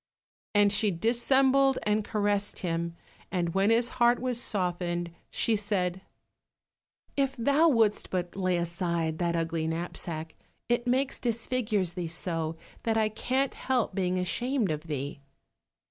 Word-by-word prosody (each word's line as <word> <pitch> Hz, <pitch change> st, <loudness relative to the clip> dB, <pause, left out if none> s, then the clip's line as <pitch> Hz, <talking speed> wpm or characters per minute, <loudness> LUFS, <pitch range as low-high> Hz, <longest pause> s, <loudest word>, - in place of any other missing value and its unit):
and 205 Hz, 0 st, +5 dB
she 205 Hz, +1 st, +3 dB
dissembled 265 Hz, +7 st, +3 dB
and 210 Hz, 0 st, +1 dB
caressed 205 Hz, -1 st, 0 dB
him, 170 Hz, -2 st, -2 dB, 0.4 s
and 175 Hz, -3 st, -1 dB
when 195 Hz, +2 st, +3 dB
his 235 Hz, +1 st, +3 dB
heart 240 Hz, +1 st, +6 dB
was 250 Hz, -1 st, -1 dB
softened, 175 Hz, -4 st, -1 dB, 0.2 s
she 225 Hz, -, +1 dB
said, 190 Hz, -3 st, -1 dB, 1.1 s
"If 275 Hz, -1 st, +1 dB
thou 280 Hz, +7 st, +4 dB
wouldst 225 Hz, -6 st, +2 dB
but 180 Hz, -2 st, -3 dB
lay 185 Hz, -2 st, +1 dB
aside 170 Hz, -2 st, -1 dB
that 170 Hz, -1 st, 0 dB
ugly 165 Hz, -1 st, -1 dB
knapsack, 165 Hz, -1 st, -3 dB, 0.3 s
it 240 Hz, 0 st, 0 dB
makes 260 Hz, +2 st, +1 dB
disfigures 225 Hz, -5 st, -1 dB
thee 175 Hz, -1 st, -3 dB
so, 165 Hz, -1 st, -2 dB, 0.3 s
that 225 Hz, -1 st, 0 dB
I 215 Hz, -1 st, +3 dB
can't 260 Hz, +5 st, -1 dB
help 255 Hz, -6 st, 0 dB
being 185 Hz, -1 st, 0 dB
ashamed 230 Hz, -, 0 dB
of 155 Hz, +2 st, -4 dB
thee." 140 Hz, -1 st, -4 dB
200 Hz, 135 wpm, -29 LUFS, 170-235 Hz, 1.1 s, heart